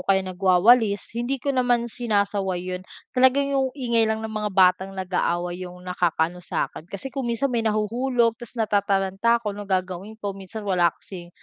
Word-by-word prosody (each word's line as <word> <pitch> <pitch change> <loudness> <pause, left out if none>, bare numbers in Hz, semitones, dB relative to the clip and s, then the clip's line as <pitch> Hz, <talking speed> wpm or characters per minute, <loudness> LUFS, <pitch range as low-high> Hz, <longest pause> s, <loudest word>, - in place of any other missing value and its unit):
kaya 190 -1 +3
nagwawalis, 195 +4 +3
hindi 240 +4 -1
ko 280 +2 -2
naman 245 -2 +2
sinasaway 200 -6 -1
yun. 180 - -4 0.3
Talaga 260 +1 +5
yung 270 -1 +1
ingay 235 -4 +2
lang 220 0 -2
ng 220 - -5
mga 210 -1 -2
batang 190 0 +3
nag-aaway 180 -1 -1
yung 180 - -12
nakakaano 175 -1 0
sa'kin. 165 -1 -4
Kasi 200 +8 -6
kung 270 -3 -3
minsan 235 +3 0
may 235 - +1
nahuhulog 230 +2 +1
tapos 240 +1 -9
natataranta 205 +1 +1
ako, 210 - -1
ano 205 0 -8
gagawin 185 +3 -2
ko. 205 -3 -4
Minsan 195 +3 -8
wala 180 -3 +3
kasing 175 -3 -10
205 Hz, 170 wpm, -24 LUFS, 185-235 Hz, 0.3 s, Talaga